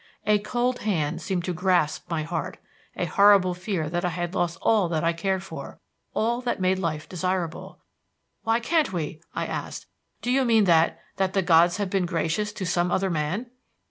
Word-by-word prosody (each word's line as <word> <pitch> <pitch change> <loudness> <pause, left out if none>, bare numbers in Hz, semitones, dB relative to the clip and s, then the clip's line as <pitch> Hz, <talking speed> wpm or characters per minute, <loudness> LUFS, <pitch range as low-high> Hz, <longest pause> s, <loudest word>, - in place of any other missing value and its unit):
A 210 -1 +4
cold 245 +4 -1
hand 170 -6 -1
seemed 175 +1 -2
to 180 - -1
grasp 175 -3 +1
my 165 -2 -1
heart 165 +3 -4 0.4
a - - -1
horrible 200 -3 +5
fear 180 -3 -3
that 175 +3 -2
I 180 - +1
had 175 +1 -3
lost 170 -2 -1
all 210 -6 +2
that 160 -2 -1
I 165 0 +2
cared 190 +3 -1
for - - -8 0.4
all 235 +3 +1
that 245 -4 -2
made 185 0 +2
life 155 -4 -2
desirable. 180 -2 -3 0.6
"Why 225 +1 +1
can't 305 - +1
we?" 160 -2 -4
I - - -1
asked. - - -5 0.4
"Do 245 - 0
you 265 +1 +3
mean 225 -3 +4
that 165 -3 +3 0.2
that 190 -1 0
the 195 - +2
gods 175 +1 +5
have 200 -3 -2
been 190 -3 +1
gracious 170 +4 -1
to 205 -3 -5
some 175 0 +1
other 190 0 +1
man?" 175 +10 -2
185 Hz, 190 wpm, -25 LUFS, 170-205 Hz, 0.6 s, horrible